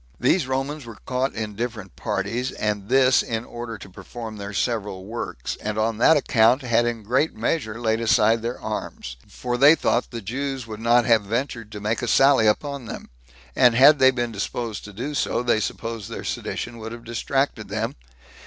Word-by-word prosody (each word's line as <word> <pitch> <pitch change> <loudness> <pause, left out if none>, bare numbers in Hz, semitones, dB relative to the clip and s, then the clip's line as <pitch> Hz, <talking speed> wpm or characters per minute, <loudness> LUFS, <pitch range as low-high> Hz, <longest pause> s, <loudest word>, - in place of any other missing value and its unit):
These 175 -8 +2
Romans 135 +3 -2
were 115 -3 -9
caught 130 +1 -1
in 110 -2 -4
different 110 -5 -5
parties, 115 +7 -2
and 105 -1 -2
this 130 -1 +5
in 115 0 -3
order 120 -2 -7
to - - -11
perform 110 +4 -8
their 100 0 -6
several 100 -2 -2
works, 115 +3 -5
and 105 0 -4
on 110 0 0
that 160 +6 +6
account 125 0 +3
had 120 -1 +2
in 115 -2 -3
great 130 +9 +1
measure 115 -1 -2
laid 115 -1 0
aside 110 0 +3
their 120 +2 -4
arms; 105 - -5
for 125 -1 -4
they 145 +4 +8
thought 120 -6 0
the 120 - -6
Jews 130 +4 -4
would 110 -2 -8
not 120 +1 +4
have 115 -3 +4
ventured 115 +1 -3
to 105 - -6
make 105 +2 -1
a 120 - -2
sally 135 -2 +5
upon 140 +4 0
them; - - -8 0.4
and 120 -2 +5
had 140 +4 +7
they 130 0 +7
been 120 -2 -1
disposed 110 +2 -4
so 105 - -9
to 125 +9 -5
do, 125 - 0
they 120 -3 +2
supposed 115 -1 -4
their - - -6
sedition 115 - -4
would 110 +1 -6
have 115 0 -10
distracted 120 0 -1
them. 110 +3 -2
115 Hz, 190 wpm, -23 LUFS, 110-130 Hz, 0.4 s, they